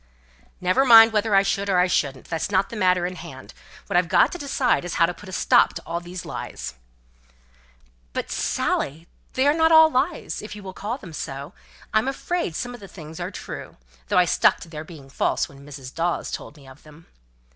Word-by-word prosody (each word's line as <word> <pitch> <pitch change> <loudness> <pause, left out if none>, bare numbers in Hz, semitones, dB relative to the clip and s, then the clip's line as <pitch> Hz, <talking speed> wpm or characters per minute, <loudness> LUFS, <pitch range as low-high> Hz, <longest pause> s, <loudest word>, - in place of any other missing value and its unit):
"Never 185 +8 +2
mind 225 -3 +8
whether 210 -1 +2
I 195 - +6
should 200 0 -1
or 190 - +3
I 180 - +5
shouldn't. 140 -7 -1
That's 165 +3 -3
not 195 -1 +1
the - - -6
matter 185 -3 +2
in 180 0 -4
hand. - - -10 0.3
What - - -4
I've - - +4
got - - +4
to 355 - -6
decide 275 - +1
is, 175 - -5
how 170 - +5
to 175 - -3
put 190 +2 -13
a - - -8
stop - - +3
to - - -6
all 170 +1 -3
these 175 0 -8
lies." - - -6 1.4
"But, - - -3 0.3
Dorothy, 155 +4 -1 0.3
they 260 - +1
are 290 - +5
not 320 0 +3
all 320 0 +8
lies 295 +5 -1
if 210 0 -8
you 205 - -10
will 190 -1 -7
call 215 +7 -4
them 175 - -11
so; 140 -1 -6 0.4
I'm 215 +4 +2
afraid 275 - -2
some 245 +5 -4
things 165 -7 -11
are - - -3
true; - - -8 0.3
though - - +1
I - - +6
stuck - - +3
to 165 - -10
their 155 -1 -7
being 155 -4 -12
false 135 - 0
when 140 0 -15
Mrs. 135 -3 -10
Dawes 170 +1 -1
told 150 - -7
me 140 -2 -16
of 130 +1 -15
them." 155 +2 -17
185 Hz, 210 wpm, -23 LUFS, 160-225 Hz, 1.4 s, mind